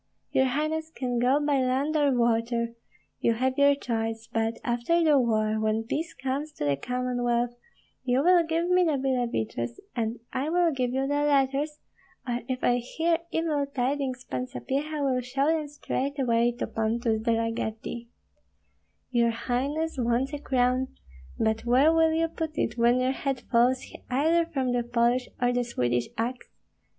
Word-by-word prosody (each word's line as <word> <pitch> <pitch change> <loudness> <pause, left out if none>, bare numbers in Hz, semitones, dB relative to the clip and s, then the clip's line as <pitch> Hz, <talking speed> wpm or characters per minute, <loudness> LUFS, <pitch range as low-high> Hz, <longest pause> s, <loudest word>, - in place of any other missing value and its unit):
Your 265 - +3
highness 310 +4 -1
can 250 -6 -2
go 255 +4 +3
by 290 -2 +1
land 265 +4 0
or 290 -2 +3
water 235 -1 +1 0.5
(you 230 - +2
have 260 +3 0
your 280 0 +5
choice); 225 -4 -3
but 225 0 0
after 245 +8 +1
the 300 -3 +5
war, 220 -3 +1
when 220 +1 0
peace 310 +8 -3
comes 275 +3 -3
to 145 - -4
the 140 -1 +2
Commonwealth, 245 - -1 0.5
you 260 +1 +2
will 355 +1 +6
give 330 +1 -1
me 360 0 +4
the 315 -5 +2
Billeviches, 235 - -2 0.2
and 230 -1 -2
I 275 +4 -1
will 345 0 +3
give 255 -3 -1
you 265 +1 0
the 285 +2 0
letters, 285 +1 +1 0.5
or 240 0 -1
if 255 -1 -3
I 245 - +3
hear 325 +7 0
evil 305 -4 0
tidings 265 -1 -2
Pan 125 - -4
Sapyeha 285 - -3
will 255 -2 +1
show 265 +3 -1
them 315 -1 +1
straightway 265 -4 0
to - - -1
Pontus 225 0 -1
de 230 +1 +1
la 230 0 0
Gardie. 225 +1 -5 1.0
Your 235 -2 +3
highness 270 +7 -2
wants 245 +4 0
a 290 - -3
crown, 255 -1 +1 0.5
but 220 0 0
where 260 +7 +4
will 325 0 +4
you 325 +1 +1
put 320 -1 -5
it 220 - 0
when 240 +1 +3
your 255 +1 +2
head 270 -1 -2
falls 250 +2 +3 0.2
either 320 +6 +3
from 265 -6 -1
the 245 0 +1
Polish 240 +1 +1
or 245 0 +2
the 245 0 +1
Swedish 120 - -1
axe? 245 +3 -3
255 Hz, 165 wpm, -27 LUFS, 235-290 Hz, 1.0 s, will